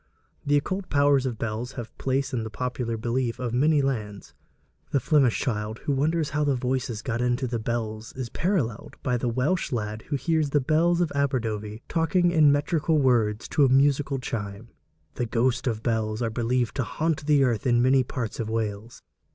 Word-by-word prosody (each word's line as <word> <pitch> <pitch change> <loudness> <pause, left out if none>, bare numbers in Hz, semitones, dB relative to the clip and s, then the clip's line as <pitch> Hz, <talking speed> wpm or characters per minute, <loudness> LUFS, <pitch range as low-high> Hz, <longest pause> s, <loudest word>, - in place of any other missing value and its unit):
The 145 0 +3
occult 185 +6 -3
powers 140 -2 +3
of 120 -3 -4
bells 115 +4 -4
have 120 -3 -8
place 135 +1 -1
in 115 -3 -1
the 110 - -5
popular 125 0 -3
belief 120 +1 -1
of 125 -2 -3
many 145 +3 +3
lands. 105 -7 -3 0.6
The 140 - +2
Flemish 135 -2 +3
child 110 -3 -2
who 145 - +1
wonders 155 +2 0
how 150 +1 0
the 140 -2 +2
voices 125 -2 -2
got 120 -2 -2
into 125 +2 0
the 120 -2 -2
bells 110 -1 -3
is 130 -2 -4
paralleled 155 - -2
by 125 -1 +1
the 120 0 -1
Welsh 135 +10 0
lad 110 -2 -3
who 145 - 0
hears 155 +1 0
the 145 - +2
bells 165 +5 +2
of 170 - 0
Aberdovey 115 -6 -2
talking 175 +2 +2
in 155 -4 +5
metrical 150 +2 +1
words 120 -6 +2
to 145 - +3
a 135 - +5
musical 140 +1 +3
chime. 110 -3 -5 0.4
The 120 - -2
ghosts 125 +3 0
of 110 -2 -2
bells 110 -1 -1
are 115 - -1
believed 120 +1 0
to 130 - +1
haunt 155 +6 -1
the 145 -2 +5
earth 120 -3 0
in 120 -1 +4
many 130 +2 +4
parts 115 -3 -5
of 110 -2 -2
Wales. 110 0 -4
125 Hz, 190 wpm, -26 LUFS, 115-145 Hz, 0.6 s, in